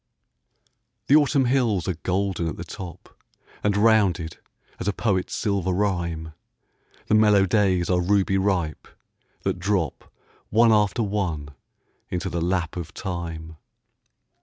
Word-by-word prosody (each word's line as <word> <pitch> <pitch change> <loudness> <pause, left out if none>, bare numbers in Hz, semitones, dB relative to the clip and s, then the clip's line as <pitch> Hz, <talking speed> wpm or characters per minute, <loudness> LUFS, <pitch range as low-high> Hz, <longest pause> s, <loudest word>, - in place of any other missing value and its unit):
The 140 - +5
Autumn 145 -3 +4
hills 120 -9 +1
are 95 - +1
golden 90 +1 -1
at 80 - -4
the 85 - -5
top, 90 +1 -10 0.5
And 105 -1 +2
rounded 100 -7 +2 0.4
as - - -4
a 105 - +1
poet's 100 -4 -1
silver 100 -3 0
rhyme; 85 -5 -1 0.7
The - - -1
mellow 105 -2 +5
days 95 -3 +2
are 90 -1 +2
ruby 95 +1 +2
ripe, 95 -5 -1 0.6
that - - -1
drop 90 -6 -2 0.4
One 115 +2 +5
after 105 +2 +2
one 90 -8 -2 0.6
into 90 - -2
the 85 - -2
lap 90 -1 -1
of 85 - -7
time. 80 -4 -5
95 Hz, 130 wpm, -24 LUFS, 85-105 Hz, 0.7 s, The